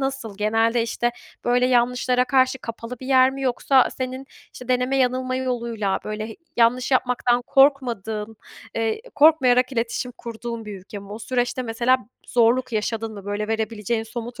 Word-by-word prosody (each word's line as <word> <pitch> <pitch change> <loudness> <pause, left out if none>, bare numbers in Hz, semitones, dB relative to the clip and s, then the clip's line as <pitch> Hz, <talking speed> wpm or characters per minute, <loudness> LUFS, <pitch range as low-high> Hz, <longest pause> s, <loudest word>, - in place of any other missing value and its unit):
nasıl? 270 -7 -3
Genelde, 225 +2 +2
işte, 240 +1 -1 0.3
böyle 245 +1 +3
yanlışlara 250 0 +2
karşı 260 0 +2
kapalı 230 +1 -7
bir 260 - -8
yer 260 -1 +5
mi? 270 0 -6
Yoksa 260 +1 +3
senin 260 +1 -4 0.3
işte 250 0 -11
deneme 250 +2 +1
yanılma 255 0 +1
yoluyla 235 -6 -1
böyle. 215 +1 -5 0.2
Yanlış 240 +2 +3
yapmaktan 250 -1 +2
korkmadığın, 230 -6 +2 0.4
eee, 225 - -1
korkmayarak 265 -4 +5
iletişim 235 +1 -2
kurduğun 230 0 -6
bir 210 -2 -7
ülke 205 +2 -9
mi? 200 0 -12
O 215 - -6
süreçte 245 +2 -1
mesela 240 +2 +2 0.3
zorluk 245 +1 +2
yaşadın 220 +1 -2
mı? 200 -2 -10
Böyle 205 +1 -3
verebileceğin 220 0 -1
somut 235 +2 -7
240 Hz, 150 wpm, -23 LUFS, 225-255 Hz, 0.4 s, yer